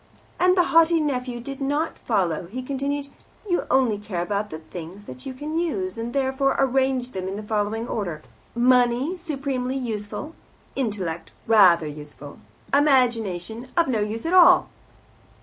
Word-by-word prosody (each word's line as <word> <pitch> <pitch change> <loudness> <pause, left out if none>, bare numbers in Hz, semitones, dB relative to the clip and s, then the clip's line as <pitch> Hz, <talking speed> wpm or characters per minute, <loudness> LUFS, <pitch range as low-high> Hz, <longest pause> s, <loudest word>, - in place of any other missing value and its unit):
As 365 0 +4
the 355 - +5
haughty 330 0 +5
nephew 250 -5 -2
did 275 +3 -7
not 290 +4 -1
follow, 180 -7 0
he 255 +7 -6
continued, 280 +1 -3 0.4
"You 350 -2 0
only 250 -6 +2
care 200 -5 -3
about 205 +2 -2
the' 155 - -6
things 170 +4 -9
that 255 +6 -10
you 265 - -5
can 305 +4 -3
use, 195 - -2
and 230 +1 -4
therefore 270 +1 +1
arrange 265 -1 +1
them 185 -3 -4
in 190 - -4
the 210 - -6
following 215 +2 -1
order: 180 -10 -4 0.3
Money, 250 +5 +3
supremely 275 -6 -3
useful; 230 +5 -5 0.4
intellect, 195 -10 -3
rather 185 -7 +6
useful; 150 -1 -9 0.3
imagination, 240 - +2
of 340 - +4
no 240 -5 0
use 215 +4 -3
at 335 - -1
all. 360 -2 +7
245 Hz, 150 wpm, -24 LUFS, 205-275 Hz, 0.4 s, all